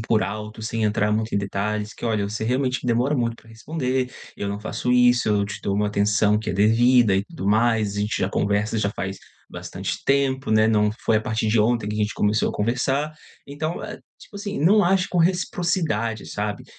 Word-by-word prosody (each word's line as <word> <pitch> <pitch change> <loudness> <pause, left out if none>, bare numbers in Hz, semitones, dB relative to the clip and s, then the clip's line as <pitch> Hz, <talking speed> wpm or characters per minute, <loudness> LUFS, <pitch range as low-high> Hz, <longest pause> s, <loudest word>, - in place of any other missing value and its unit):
por 110 -1 +1
alto, 105 +2 -6
sem 115 0 -2
entrar 105 0 +1
muito 110 +1 -1
em - - +3
detalhes, 105 +2 -3
que: - - -9
"Olha, 105 -3 0
você 110 +1 -4
realmente 130 +2 0
demora 125 +4 +1
muito 115 -2 -1
para 115 - -20
responder, 130 +1 -2 0.3
eu 100 - -3
não 100 0 -3
faço 110 +3 -3
isso. 125 -2 +4
Eu 105 -1 +2
te 100 - -7
dou 100 - -1
uma 105 +1 +1
atenção 105 0 +2
que 110 - -3
é - - -3
devida 115 +2 +4
e 95 +1 +1
tudo 95 -2 -7
mais. 110 -1 +2
A - - -1
gente 105 +1 -1
já 95 - +1
conversa, 105 +2 0
já 100 -1 0
faz 95 -1 -5 0.3
bastante - - -5
tempo, 135 -2 +1
né. 110 0 +4
Não 105 -1 +3
foi 110 - +3
a - - -4
partir 110 0 -2
de 110 +1 +3
ontem 110 0 +1
que 105 - -3
a - - -3
gente 105 0 0
começou 105 +1 +1
a - - -3
conversar". 135 +7 -1 0.3
Então, 155 +4 -4
eh, 210 - -8 0.2
tipo - - -17
assim, 200 0 -4
não 195 +9 +5
acho 185 0 +2
com 180 - -1
reciprocidade, 165 - 0
sabe. 105 -1 -4
110 Hz, 215 wpm, -23 LUFS, 105-125 Hz, 0.3 s, não